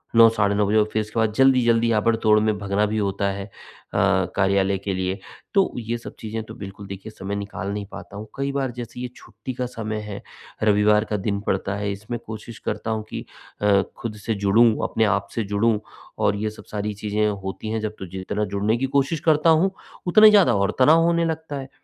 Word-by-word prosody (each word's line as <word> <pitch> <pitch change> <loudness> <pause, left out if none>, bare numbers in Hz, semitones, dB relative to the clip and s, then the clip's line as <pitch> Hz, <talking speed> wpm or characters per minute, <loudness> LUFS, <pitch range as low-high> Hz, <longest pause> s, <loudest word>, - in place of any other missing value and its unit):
9 115 0 +9
साढ़े 100 -1 +2
9 105 0 +2
बजे 105 +2 +2
और 105 - +6
फिर 110 - 0
इसके 110 +2 -4
बाद 110 -1 +1
जल्दी-जल्दी, 120 -2 +4
आबड़ 115 +1 +3
तोड़ 110 -1 +4
में 110 -1 +1
भगना 100 +1 0
भी 105 +1 -2
होता 100 -1 -1
है। 100 0 -5
अ, - - -16 0.9
कार्यालय 95 0 +2
के 100 +1 -3
लिए, 95 +1 -2 0.3
तो 195 -2 +3
ये 115 +1 -3
सब 115 - -10
चीज़ें 110 0 -4
तो - - -10
बिल्कुल 100 0 -9
देखिए 100 +3 -8
समय 100 -1 -5
निकाल 100 -1 -4
नहीं 105 0 -4
पाता 100 - -9
हूँ, 110 +1 -7
कई 140 0 -2
बार 135 -2 -1
जैसे 120 0 -8
ये 125 - -2
छुट्टी 115 +4 -8
का 125 0 -3
समय 110 -3 -4
है, 100 -1 -6 0.4
रविवार 105 0 +4
का 105 - +1
दिन 100 +1 -1
पड़ता 95 +1 0
है। 100 0 -2
इसमें 105 +4 -5
कोशिश 110 +1 -8
करता 110 +1 -3
हूँ 110 -1 -2
कि - - -6 0.4
अ, 100 -1 +4
खुद 115 -2 -5
से 110 - 0
जुड़ूँ, 110 +5 +6 0.2
अपने 110 - +1
आप 100 -1 +1
से 115 - 0
जुड़ूँ 105 +2 +1 0.4
और 100 - +2
ये 105 +1 -2
सब 105 - -12
सारी 105 0 -2
चीज़ें 105 +1 0 0.2
होती 95 +3 -5
हैं, 110 +1 -1
जब 110 0 -4
तो 95 - -5
जि 95 +1 -8
जितना 105 +3 -2
जुड़ने 105 +3 +1
की 130 - 0
कोशिश 140 +4 +1
करता 155 +1 +4
हूँ, 165 +4 +4 0.4
उतना 215 +5 +7
ही 215 - +10
ज़्यादा 200 - +5
और 100 0 +1
तनाव 155 +5 +6
होने 170 0 +2
लगता 160 -2 -3
है। 135 0 -8
110 Hz, 225 wpm, -23 LUFS, 100-120 Hz, 0.9 s, ही